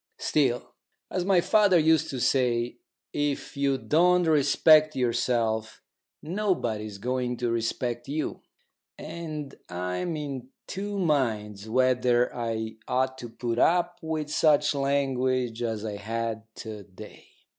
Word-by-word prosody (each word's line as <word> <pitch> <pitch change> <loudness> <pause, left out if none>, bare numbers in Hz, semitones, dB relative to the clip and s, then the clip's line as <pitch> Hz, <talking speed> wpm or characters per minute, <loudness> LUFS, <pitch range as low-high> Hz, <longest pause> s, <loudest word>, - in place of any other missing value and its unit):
Still, 130 -5 0 0.4
as 180 -1 -1
my 190 -2 +4
father 205 -1 +4
used 160 0 +3
to 130 - -4
say, 120 -2 +1 0.3
if 145 -1 -2
you 140 -1 +1
don't 180 +5 +3
respect 155 0 +5
yourself, 115 -3 0 0.4
nobody 160 - -1
is 100 -2 -8
going 125 +2 -2
to 120 -1 -1
respect 120 +1 -2
you, 150 +3 -3 0.6
and 155 -3 -6 0.2
I'm 90 - -3
in 135 -4 -5 0.2
two 205 +1 -4
minds 110 - 0
whether 125 0 +2
I 110 -2 -3
ought 130 0 0
to 120 - -7
put 120 0 -3
up 175 0 +2
with 155 -2 -3
such 150 -1 +3
language 130 -4 0
as 110 -2 -2
I 105 -2 -4
had 110 +1 -3
to 110 -2 -7
day. 100 +2 -13
130 Hz, 125 wpm, -27 LUFS, 115-155 Hz, 0.6 s, respect